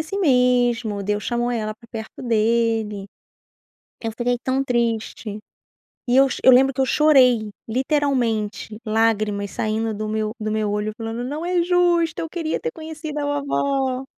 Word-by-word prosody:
assim 320 +6 -4
mesmo, 245 - +2
Deus 210 +1 -1
chamou 240 0 -1
ela 215 -2 -2
pra 225 +2 -19
perto 220 -2 -8
dele." 225 -3 0 0.9
Eu 225 - -3
fiquei 245 +1 -1
tão 265 +1 0
triste 230 -3 -2 0.7
e 245 +1 +2
eu 270 0 +6
cho - - -4
eu 260 - +8
lembro 265 +1 +5
que 270 - -2
eu - - +3
chorei, 255 -8 +4 0.2
literalmente, 235 -5 -1
lágrimas 215 -2 0
saindo 220 0 -1
do 215 +1 -4
meu 215 0 -2
do 215 0 -3
meu 215 -1 0
olho, 210 +1 -2
falando: 225 +2 -4
"Não 300 +6 -4
é 355 -1 +2
justo, 345 -2 +2
eu 325 - -3
queria 320 -1 -3
ter 475 - -2
conhecido 315 -3 -7
a - - -2 0.2
vovó." 270 -2 -1
240 Hz, 160 wpm, -22 LUFS, 215-275 Hz, 0.9 s, eu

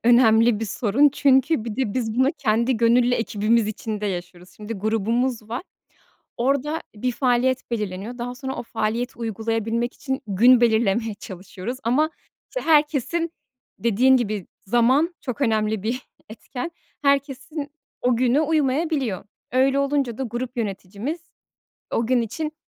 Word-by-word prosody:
önemli 230 -2 +5
bir - - -1
sorun. 230 +6 +3
Çünkü 270 -2 +3
bir 225 -2 -5
de 250 -7 -1
biz 225 -4 -1
bunu 260 +4 +3
kendi 235 +1 +2
gönüllü 240 +2 +4
ekibimiz 225 0 +1
içinde 215 -1 -4
yaşıyoruz. 180 -1 -6
Şimdi 210 +2 -6
grubumuz 225 +3 -1
var, 240 +8 -3 0.7
orada 280 +5 0
bir 250 +4 -1
faaliyet 255 +1 +1
belirleniyor. 215 +1 -4
Daha 245 +1 -4
sonra 265 +1 -5
o - - -4
faaliyeti 230 +2 -2
uygulayabilmek 225 +1 -2
için 265 -2 -3
gün 235 +5 +5
belirlemeye 220 -1 +2
çalışıyoruz. 195 +5 -7
Ama, 300 +7 +2 0.4
işte, - - -3
herkesin 310 +2 +2 0.5
Dediğin 245 +4 +4
gibi, 210 -6 -2 0.2
zaman 260 - +3
çok 265 0 -5
önemli 220 -4 +1
bir 235 +4 -1 0.3
etken, 250 +7 -6 0.3
herkesin 280 +1 0 0.3
o 245 -1 +2
günü 255 +4 +3
uymayabiliyor. 295 - 0 0.3
Öyle 265 +2 +3
olunca 275 -4 0
da - - -1
grup 245 +1 -4
yöneticimiz 210 - -4 0.7
o 230 - 0
gün 255 0 +3
için, 300 +7 -4
240 Hz, 135 wpm, -23 LUFS, 220-265 Hz, 0.7 s, önemli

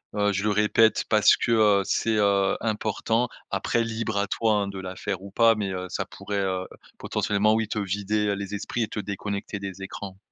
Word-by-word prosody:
heu, 105 0 +2
je 100 +2 -1
le 105 - +2
répète 105 +2 +3
parce 105 -1 +5
que, - - -1
heu, 105 -3 +5
c'est, 110 -1 +1
heu, 100 -2 +2
important. 110 +2 0 0.2
Après 120 -1 0
libre 110 -2 -3
à 100 0 +1
toi, 110 +2 +1
hein, 100 -1 0
de 100 -1 -6
la 95 0 -6
faire 100 -3 -4
ou 100 - -9
pas 115 +3 +5
mais, 100 -2 -2
heu, 90 0 -4
ça - - -3
pourrait, 100 -1 -5
heu, 95 -1 -1 0.3
potentiellement 105 +1 +1
oui 110 0 0
te 110 - -4
vider, 105 +2 -1
heu, 100 - +2
les 100 0 -5
esprits 115 +3 -2
et - - -2
te - - -5
déconnecter 100 0 -4
des 95 -1 -7
écrans. 95 0 -7
105 Hz, 215 wpm, -25 LUFS, 100-110 Hz, 0.3 s, parce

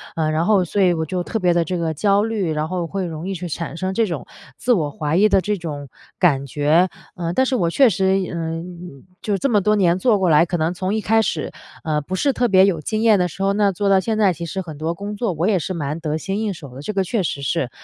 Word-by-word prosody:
呃， 160 -1 0
然 160 +2 0
后 205 -2 +4
所 200 +4 -1
以 180 -2 +4
我 160 -1 -2
觉 180 +4 -4
得 180 - -1
特 225 - -3
别 180 -3 +3
的 170 -1 +1
这 180 +3 -2
个 165 -2 -1
焦 200 +5 +2
虑， 210 -7 -1
然 155 0 -1
后 180 -2 -2
会 190 +3 -3
容 165 +1 -6
易 195 - -3
去 175 0 -5
产 165 +2 -5
生 185 +2 -3
这 225 +2 +1
种 165 -6 -5 0.3
自 250 - 0
我 165 -11 +2
怀 150 +3 -1
疑 210 +3 +5
的 195 -2 +3
这 210 +1 -1
种 145 -5 -6 0.3
感 140 -7 +3
觉。 150 +6 +2 0.3
呃， 170 -1 -3
但 260 - +3
是 260 - 0
我 170 -5 +1
确 260 +8 +5
实， 190 -1 +1 0.2
嗯， 170 -2 -6 0.2
就 205 -2 -1
这 275 - 0
么 215 -4 +4
多 210 +2 +2
年 180 -3 +2
做 225 0 +3
过 185 -2 +2
来， 155 +1 +5
可 175 - -3
能 160 +2 0
从 185 +2 -2
一 220 - -1
开 225 +2 +3
始， 165 -7 -2 0.3
呃， 155 -2 0
不 180 +6 -5
是 275 +9 +2
特 245 -1 +1
别 190 -3 +6
有 185 -5 +1
经 215 +7 -2
验 220 -3 +5
的 180 - +2
时 185 +3 -6
候 195 - +2
那 205 0 +3
做 200 +2 -1
到 195 -1 +5
现 220 +3 -2
在， 200 -4 +3
其 170 +1 -6
实 180 +3 -4
很 160 -5 -9
多 160 +3 -2
工 200 +4 -6
作 220 -1 -1
我 165 +3 -1
也 210 -3 +3
是 180 +2 -3
蛮 150 -2 -3
得 155 -1 -2
心 195 +6 -3
应 215 -2 -1
手 140 -7 -11
的。 135 - -8
这 150 - -4
个 195 -2 0
确 200 +2 -1
实 140 -4 -3
是， 140 -1 -1
180 Hz, 305 characters per minute, -21 LUFS, 160-200 Hz, 0.3 s, 别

